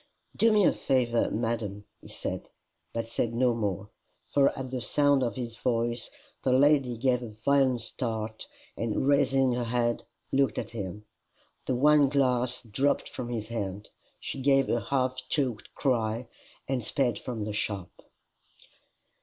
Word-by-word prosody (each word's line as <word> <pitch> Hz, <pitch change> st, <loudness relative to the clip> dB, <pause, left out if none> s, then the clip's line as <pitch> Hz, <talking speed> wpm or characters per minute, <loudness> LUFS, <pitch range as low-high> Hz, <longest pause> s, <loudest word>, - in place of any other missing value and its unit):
"Do 225 Hz, 0 st, +4 dB
me 210 Hz, -3 st, +5 dB
the -, -, +5 dB
favour, 120 Hz, -3 st, +1 dB
madam," 110 Hz, -3 st, -2 dB, 0.2 s
he -, -, -13 dB
said -, -, -5 dB, 0.4 s
but 115 Hz, 0 st, -3 dB
said 115 Hz, 0 st, -1 dB
no 125 Hz, 0 st, +3 dB
more. 105 Hz, -3 st, -3 dB, 0.4 s
For 140 Hz, -1 st, +5 dB
at 130 Hz, -1 st, -5 dB
the 130 Hz, -1 st, -2 dB
sound 145 Hz, +2 st, +3 dB
of 120 Hz, -2 st, -1 dB
his 120 Hz, -3 st, -5 dB
voice, 120 Hz, -1 st, 0 dB, 0.3 s
the 130 Hz, -, +1 dB
lady 135 Hz, -3 st, +4 dB
gave 125 Hz, +1 st, +2 dB
a 120 Hz, -, -6 dB
violent 130 Hz, +3 st, +2 dB
start, 110 Hz, -2 st, -4 dB, 0.3 s
and 115 Hz, +3 st, -1 dB
raising 135 Hz, -2 st, +3 dB
her 120 Hz, 0 st, -1 dB
head 120 Hz, 0 st, 0 dB, 0.3 s
looked 135 Hz, -5 st, +2 dB
at -, -, -3 dB
him. 105 Hz, -2 st, -6 dB, 0.6 s
The 130 Hz, -, +1 dB
wine 145 Hz, +1 st, +5 dB
glass 125 Hz, -2 st, +1 dB
dropped 130 Hz, +6 st, 0 dB
from 120 Hz, -2 st, -5 dB
his 110 Hz, -2 st, -4 dB
hand. 105 Hz, -3 st, -4 dB, 0.3 s
She 135 Hz, -, -5 dB
gave 135 Hz, 0 st, +3 dB
a 120 Hz, -, +1 dB
half 130 Hz, +2 st, 0 dB
choked 130 Hz, -8 st, -1 dB
cry, 115 Hz, -3 st, 0 dB, 0.4 s
and 130 Hz, -3 st, -1 dB
sped 120 Hz, -1 st, 0 dB
from 120 Hz, -4 st, -4 dB
the 105 Hz, 0 st, -3 dB
shop. 100 Hz, -3 st, -2 dB
120 Hz, 155 wpm, -28 LUFS, 115-135 Hz, 0.6 s, me